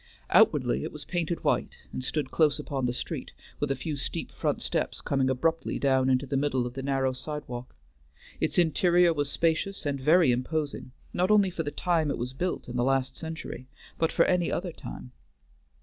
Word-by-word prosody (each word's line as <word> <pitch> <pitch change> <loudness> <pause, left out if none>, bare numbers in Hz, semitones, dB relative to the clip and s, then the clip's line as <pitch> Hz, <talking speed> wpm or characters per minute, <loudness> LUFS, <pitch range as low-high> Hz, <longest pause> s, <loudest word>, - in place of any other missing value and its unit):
Outwardly, 65 +4 +4
it - - -4
was 150 -1 -6
painted 170 -1 -2
white - - 0 0.2
and 130 - -4
stood 140 0 -2
close 155 -3 +3
upon 135 -3 -2
the - - 0
street, 125 - -5 0.3
with 145 - 0
a 135 - +1
few 150 +3 -4
steep 135 - -4
front - - -1
steps - - -2
coming 135 -1 +1
abruptly 160 +6 0
down 130 -1 +2
into 130 +1 +2
the 140 - -3
middle 135 -3 +1
of 120 - -5
the 135 - -5
narrow 135 -1 0
sidewalk; 130 - -6 0.6
its - - 0
interior 175 +1 +4
was 145 -2 -1
spacious 165 +5 0
and 140 -2 -1
very 155 0 +5
imposing, 140 +2 -2 0.2
not 180 +2 +1
only 205 -3 +5
for 170 - -3
the 150 - -2
time 165 -1 +1
it 140 - -1
was 125 +2 -4
built 180 +7 -2
in 125 0 -4
the 120 - +2
last 135 0 +1
century, 160 -5 -6 0.3
but 165 - +2
for 170 - +4
any 180 -2 +2
other 180 0 -2
time. 125 - -9
145 Hz, 195 wpm, -28 LUFS, 130-165 Hz, 0.6 s, very